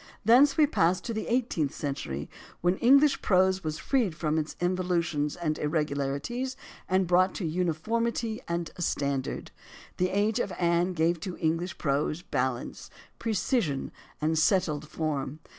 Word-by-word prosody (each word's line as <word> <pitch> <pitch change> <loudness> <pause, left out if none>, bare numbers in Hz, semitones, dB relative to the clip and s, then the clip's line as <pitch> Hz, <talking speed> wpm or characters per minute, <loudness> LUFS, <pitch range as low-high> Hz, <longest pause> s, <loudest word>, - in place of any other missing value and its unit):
Thence 270 +5 +6
we 310 - +6
pass 185 - +2
to 230 - -4
the 220 - -3
eighteenth 230 - 0
century, 75 - -4 0.3
when 175 +2 +2
English 275 +4 +5
prose 190 0 +3
was 155 0 -3
freed 235 - 0
from 155 -1 0
its 155 0 -4
involutions 175 -4 0
and 155 -3 -2
ir 150 - -1
regularities 150 - -2 0.3
and 185 0 +3
brought 185 +2 +3
to 185 - -3
uniformity 215 +8 -1
and 170 0 -1
to - - -11
a - - -6
stand 140 -5 -1
ard. - - -6 0.5
The 180 0 +1
age 210 +4 +1
of 200 - -1
Anne 175 +1 +2
gave 165 0 +1
to 180 +2 -6
English 165 +3 -1
prose 150 +3 -1
balance, 125 -5 -3 0.3
precision, 215 - 0 0.3
and 155 +1 +1
settled 155 -4 +2
form. 150 -3 -3
175 Hz, 155 wpm, -28 LUFS, 155-205 Hz, 0.5 s, Thence